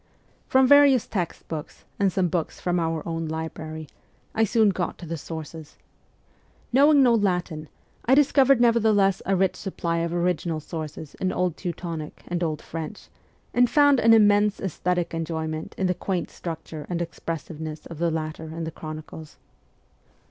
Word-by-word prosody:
From 265 0 +5
various 280 -3 +6
text 180 -6 -4
books 155 -2 -7
and 200 -2 +3
some 185 0 +1
books 170 -1 -2
from 175 0 0
our 165 -1 -2
own 165 -1 -3
library, 160 0 -5 0.5
I 225 0 +3
soon 220 0 +3
got 185 -2 -2
to 175 - -9
the 165 +1 -4
sources. 160 0 -8 1.0
Knowing 285 +2 +6
no 245 -2 +5
Latin, 180 -7 0 0.4
I 260 - +5
discovered 275 -2 +5
nevertheless 220 -5 +3
a 195 - +3
rich 190 0 +2
supply 170 -4 -2
of 165 0 -1
original 175 -2 0
sources 155 -1 -7
in 185 - +1
Old 180 -3 0
Teutonic 165 -3 -6
and 175 0 -2
Old 155 -2 -2
French, 165 +5 -7 0.4
and 245 0 +4
found 285 -3 +5
an 230 - +5
immense 205 -1 +4
aesthetic 180 -1 -1
enjoyment 160 -1 -4
in 190 - 0
the 180 - +2
quaint 180 0 -3
structure 160 -2 -7
and 175 -1 -1
expressiveness 160 -1 -5
of 165 -2 -9
the 170 0 +2
latter 160 0 -4
in 160 +1 -6
the 160 - -4
Chronicles. 155 0 -9
170 Hz, 155 wpm, -25 LUFS, 160-205 Hz, 1.0 s, various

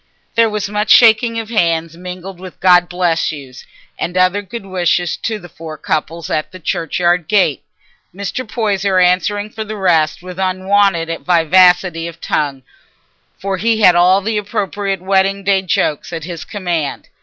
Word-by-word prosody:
There 230 -1 +3
was 210 -2 -3
much 210 +1 -2
shaking 230 0 +5
of 225 0 -5
hands 165 -6 0
mingled 180 +1 -8
with 185 -1 -11
"God 180 -2 +4
bless 175 -3 0
you's" 135 -4 -11 0.3
and 180 +2 -3
other 185 +2 +2
good 205 +1 -8
wishes 180 -2 0
to 220 -1 -3
the 175 - -12
four 160 -1 -9
couples, 160 +1 -3
at 155 - -2
the 185 - -11
churchyard 175 +1 0
gate, 190 -9 +2 0.5
Mr. 200 +7 -4
Poyser 200 -4 -1
answering 190 +3 +1
for 220 - -5
the 215 0 -7
rest 175 -3 +1
with 180 0 -9
unwonted 185 -2 +1
vivacity 180 0 +3
of 165 -1 -10
tongue, 140 -5 -2 0.7
for 195 0 -3
he 220 +2 0
had 180 -4 +7
all 180 +3 +4
the 215 +1 -1
appropriate 200 -2 -3
wedding 195 +1 +1
day 195 0 +2
jokes 165 -5 -1
at 165 -2 -5
his 165 -2 -7
command. 175 -8 -3
185 Hz, 160 wpm, -16 LUFS, 170-200 Hz, 0.7 s, had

